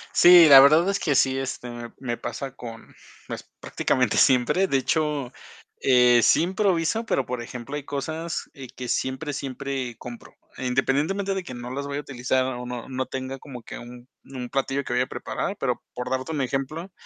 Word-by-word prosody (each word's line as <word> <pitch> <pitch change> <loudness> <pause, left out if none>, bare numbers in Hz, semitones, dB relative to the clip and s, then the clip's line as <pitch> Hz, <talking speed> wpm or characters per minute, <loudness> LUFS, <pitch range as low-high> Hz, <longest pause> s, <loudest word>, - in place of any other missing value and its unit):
Sí, 175 -2 +9
la 135 -1 +11
verdad 155 +7 +6
es 200 - 0
que 150 - +1
sí, 130 0 +3
este, 130 -2 -4
me 120 -1 -8
me 120 -3 -3
pasa 135 -1 -6
con 115 -3 -10 0.3
pues, - - -6 0.2
prácticamente 125 -4 0
siempre. 130 +9 +4
De 135 - +2
hecho, 145 -2 -1 0.5
eh, 125 -2 +5
sí - - +5
improviso, 190 +3 +1
pero, 135 - 0
por 125 -1 -4
ejemplo, 125 +4 -7
hay 145 - -4
cosas, 160 +4 -4
eh, 135 -2 -9
que 125 - -6
siempre, 130 +5 -2
siempre 135 -2 -4
compro. 120 -1 -10 0.2
Independientemente 145 +10 0
de 190 - -3
que 130 - -8
no 120 0 -7
las 140 +2 -4
vaya 140 0 -3
a - - -3
utilizar, 130 -1 -1
o 125 -1 -4
no 125 0 -6
no 130 0 -2
tenga 130 +1 -5
como 130 -4 -10
que - - -8
un 120 +1 -12 0.2
un 125 -2 -7
platillo 135 +1 -1
que 120 - -4
vaya 125 +1 +2
a - - -20
preparar, - - -4
pero - - -1
por 125 0 -5
darte 130 +4 -2
un 150 - -1
ejemplo 135 +7 -3
135 Hz, 195 wpm, -25 LUFS, 125-150 Hz, 0.5 s, la